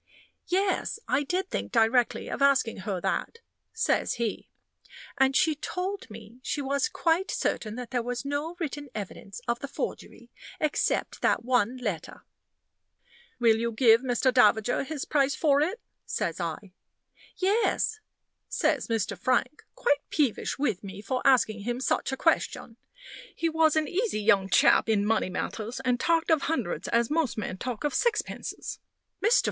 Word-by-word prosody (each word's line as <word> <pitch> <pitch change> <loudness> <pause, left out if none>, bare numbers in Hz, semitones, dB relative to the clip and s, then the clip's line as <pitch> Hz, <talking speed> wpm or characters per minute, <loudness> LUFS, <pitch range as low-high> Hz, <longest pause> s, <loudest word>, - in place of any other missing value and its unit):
"Yes, 380 +3 0
I - - +2
did 365 +6 -2
think - - -3
directly 235 +1 +2
of - - -5
asking 275 -5 +3
her 195 -3 -1
that," 465 - -2 0.3
says 450 0 0
he; 230 -3 -3 0.7
"and 270 0 +4
she 315 - +4
told 365 +4 -4
me 220 +2 -12
she 290 - -2
was 280 +8 0
quite 355 -3 +1
certain 215 -1 -2
that 250 -1 -7
there 245 -2 0
was 245 +2 -4
no 290 +4 -2
written 290 -3 -4
evidence 200 +1 -7
of 235 0 0
the 280 - -5
forgery - - -6 0.3
except 305 -2 0
that - - +2
one 245 -1 +2
letter." 205 -10 -5 1.1
"Will 230 -3 +4
you 235 +1 -1
give 230 0 +5
Mr. 255 0 +1
Davager 225 0 +4
his 290 0 -5
price 280 -1 +2
for 290 -3 +3
it?" 370 +10 0 0.3
says 165 - -2
I. 175 +3 -5 0.6
"Yes," 435 +2 +1 0.5
says 300 -5 0
Mr. 225 -2 -1
Frank, 280 +4 0
quite 290 -13 +1
peevish 285 -8 0
with 270 -10 -1
me 195 +1 -8
for 255 +5 -2
asking 235 -5 +4
him 240 +4 -3
such 265 - 0
a 265 - -3
question. 230 - 0 0.6
He 330 - 0
was 320 -1 +3
an 310 -1 +1
easy 400 - -1
young 200 -3 +3
chap 210 - +5
in 205 -2 +2
money 220 -3 +1
matters, 220 +6 -4
and 250 -1 +2
talked 330 +2 +2
of 315 -3 +4
hundreds 230 - -2
as 235 +2 +1
most 310 -7 0
men 190 -3 -4
talk 250 -4 -4
of 295 -2 0
sixpences. 475 -3 -2 0.4
"Mr. 450 +4 +5
255 Hz, 155 wpm, -27 LUFS, 225-310 Hz, 1.1 s, give